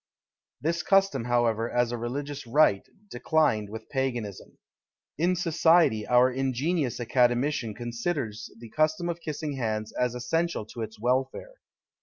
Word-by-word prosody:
This 170 +3 -1
custom, 195 - +2
however, 120 -2 +1
as 120 -1 +1
a 120 - -2
religious 140 +3 -5
rite, 115 -6 +3 0.2
declined 120 -6 +1
with 110 +1 -8
Paganism. 120 -7 -3 0.6
In 180 +3 +2
society 165 -9 +3
our 125 +1 +5
ingenious 135 +2 -1
academician 120 -1 +1
considers 120 -2 -3
the 115 -2 -11
custom 155 +3 +1
of 170 0 -4
kissing 150 -2 -4
hands 110 -3 -2
as 125 -1 -1
essential 165 +2 -1
to 115 +2 -8
its 110 -1 -6
welfare. 130 - -1
125 Hz, 130 wpm, -27 LUFS, 115-155 Hz, 0.6 s, our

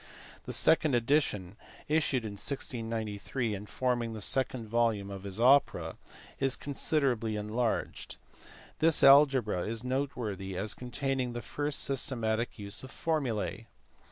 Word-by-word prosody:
The - - -5
second 155 -4 +4
edition, 115 - 0 0.3
issued 150 -6 +1
in 105 - -4
1693 115 0 -3
and 105 +1 -7
forming 120 -3 -1
the 110 - -6
second 125 +1 0
volume 110 -3 0
of 100 -1 -7
his 100 +1 -3
Opera, 135 +4 +3 0.4
is 135 -1 +2
considerably 135 -6 0
enlarged. 110 +3 -2 0.6
This 160 0 +4
algebra 135 -8 +6
is 115 +1 -3
noteworthy 120 -8 -3
as 100 +2 -2
containing 125 0 -2
the 120 - -4
first 145 0 -1
systematic 120 -4 -1
use 100 -1 -3
of 130 - -10
formulae. 125 -8 -2
120 Hz, 125 wpm, -30 LUFS, 105-135 Hz, 0.6 s, algebra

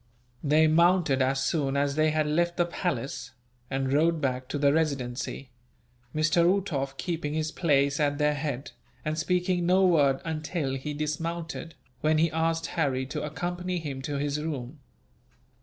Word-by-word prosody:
They 155 +2 +4
mounted 165 -3 +4
as 135 +1 +1
soon 140 -3 0
as 140 0 +1
they 155 +1 +3
had 155 0 +1
left 170 +3 +1
the 175 - +3
palace, 140 -7 -3 0.4
and 135 0 -1
rode 165 +3 +3
back 130 -3 -1
to 145 - -3
the 140 0 +3
Residency; 135 -4 -2 0.6
Mr. 155 +2 +3
Uhtoff 165 -7 0
keeping 160 -4 -3
his 155 0 -1
place 140 -4 +2
at 145 -1 +1
their 150 0 +2
head, 145 -2 -4 0.3
and 155 0 0
speaking 180 +2 0
no 190 +1 +5
word 145 -7 +4
until 155 -3 -2
he 145 +3 -4
dismounted, 165 +2 -4 0.2
when 155 +2 +2
he 165 +1 +3
asked 165 0 0
Harry 130 -4 0
to 130 - -4
accompany 175 +4 -3
him 145 -5 -5
to 145 +2 -3
his 145 +1 -1
room. 145 -2 -5
155 Hz, 155 wpm, -27 LUFS, 140-165 Hz, 0.6 s, no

